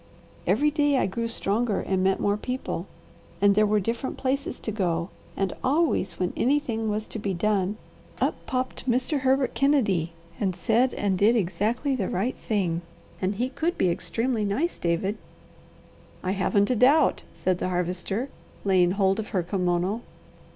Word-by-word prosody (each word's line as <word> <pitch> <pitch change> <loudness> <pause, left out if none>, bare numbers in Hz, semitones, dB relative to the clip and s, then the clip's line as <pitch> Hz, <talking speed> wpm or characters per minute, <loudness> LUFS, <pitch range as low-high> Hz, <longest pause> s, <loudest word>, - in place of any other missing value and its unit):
Every 300 +1 +3
day 290 -2 +2
I - - +2
grew 230 +5 -2
stronger 225 -1 0
and 190 -1 0
met 190 0 +2
more 205 0 +2
people, 250 +5 -4 0.5
and 200 0 +5
there 210 +1 +4
were 210 0 +3
different 230 +6 -3
places 275 +2 -1
to 220 - -4
go, 175 -4 -1 0.3
and 195 -2 0
always, 290 - +1
when 180 -1 -1
anything 240 -5 +1
was 210 +1 -1
to 220 - -7
be 200 -2 -2
done, 205 +1 0 0.4
up - - +2
popped 255 0 -2
Mr. 255 +4 +1
Herbert 265 0 +2
Kennedy 205 - +2 0.3
and 190 -3 0
said 235 +7 +2
and 195 -3 0
did 220 +4 +5
exactly 220 - 0
the 205 -7 -1
right 215 +8 -1
thing, 180 -6 -1 0.4
and 190 +2 0
he 245 +5 0
could 330 +6 -1
be 180 - +3
extremely 225 +7 -1
nice, 225 - 0
David." 185 +5 -1 1.0
"I 185 - 0
haven't 200 +2 +2
a - - +2
doubt!" 275 +6 +4
said 180 +2 0
the - - -1
Harvester, 180 +7 -2 0.4
laying 185 -2 +4
hold 195 0 +2
of 215 - -3
her 185 -5 0
kimono. 180 +3 0
210 Hz, 165 wpm, -26 LUFS, 185-255 Hz, 1.0 s, and